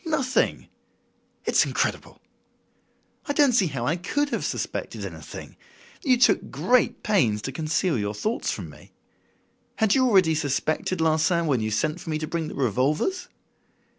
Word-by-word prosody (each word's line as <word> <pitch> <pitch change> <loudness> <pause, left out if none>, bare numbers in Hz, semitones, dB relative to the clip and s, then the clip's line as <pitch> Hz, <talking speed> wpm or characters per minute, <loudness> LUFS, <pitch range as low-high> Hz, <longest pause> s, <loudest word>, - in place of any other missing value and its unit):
"Nothing!" 275 -6 0 0.8
"It's - - +4
incredible!" - - -2 1.1
"I 285 - 0
don't 285 -3 +4
see 200 -6 +3
how 130 -6 -3
I 160 +7 +1
could 290 - -1
have - - -2
suspected - - -4
anything. - - -9 0.4
You 255 -4 +3
took 245 - +3
great 250 0 +1
pains 140 - +2
to 135 - -3
conceal 155 - 0
your 105 0 -2
thoughts 215 - -2
from - - -4
me. - - -17 0.8
Had 220 -3 +2
you 260 -1 +4
already 185 -8 +4
suspected 155 +3 -1
Larsan 160 +2 +2
when 135 -7 +1
you 110 - -1
sent 150 +10 -1
for - - -8
me 155 - 0
to 155 - -3
bring 165 0 -3
the - - -7
revolvers?" 140 - 0
165 Hz, 155 wpm, -25 LUFS, 145-235 Hz, 1.1 s, It's